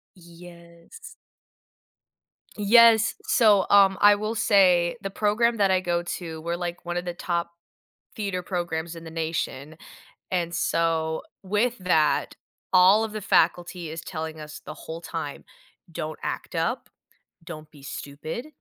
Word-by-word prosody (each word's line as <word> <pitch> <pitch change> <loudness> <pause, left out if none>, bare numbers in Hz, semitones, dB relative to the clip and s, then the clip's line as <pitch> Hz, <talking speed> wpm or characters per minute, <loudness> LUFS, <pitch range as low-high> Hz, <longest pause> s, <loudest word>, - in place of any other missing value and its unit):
Yes. 170 - -14 1.4
Yes, 225 +1 +6
so, 210 -5 +4
um, 195 -1 +6
I 205 0 +8
will 215 +2 -3
say 190 -4 +3
the 195 - -3
program 220 +4 +1
that 200 -3 +2
I 185 -1 +3
go 175 -1 -1
to, 165 -2 -6
we're, 170 +1 -2
like, 175 0 -5
one 175 0 -3
of 175 - -5
the 175 - -3
top 170 -1 -2 0.6
theater 195 -4 -3
programs 170 -2 -3
in 165 0 -10
the 160 - -9
nation, 160 -2 -4 0.5
and 175 -2 -1
so, 160 -2 0 0.2
with 210 +5 0
that, 160 -5 +1 0.4
all 190 +4 +6
of 220 - -6
the 215 -1 -5
faculty 175 -1 +1
is 160 +1 -7
telling 160 -2 -6
us 150 -1 -9
the 155 - -7
whole 160 +1 -8
time, - - -6 0.5
"Don't 155 -1 -5
act - - -5
up, - - -2 0.5
don't 155 -3 -9
be 145 -3 -17
stupid, 145 - -7
175 Hz, 140 wpm, -25 LUFS, 165-200 Hz, 1.4 s, I